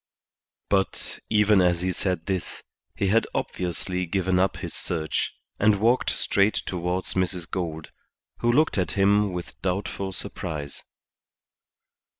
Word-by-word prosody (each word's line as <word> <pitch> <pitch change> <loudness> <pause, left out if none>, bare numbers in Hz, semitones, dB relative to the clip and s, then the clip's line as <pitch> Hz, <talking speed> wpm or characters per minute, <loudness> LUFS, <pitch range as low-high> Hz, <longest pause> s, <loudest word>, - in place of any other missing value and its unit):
But, 95 -3 -1
even 105 -2 +5
as 90 -1 +2
he 95 +1 0
said 90 -2 -2
this, 95 -3 -3 0.3
he 100 - 0
had 115 +3 +3
obviously 90 0 -2
given 95 +1 +1
up 95 0 +2
his - - -5
search, 80 -3 -2 0.2
and 105 -1 +4
walked 120 +4 +3
straight 100 +1 +2
towards 90 +1 -2
Mrs. 90 -2 -1
Gould, 80 -4 -4 0.5
who 120 - +3
looked 150 -4 +3
at 90 -4 0
him 100 +1 +3
with 90 -1 -7
doubtful 95 +1 -2
surprise. 75 -5 -5
95 Hz, 130 wpm, -25 LUFS, 90-100 Hz, 0.5 s, even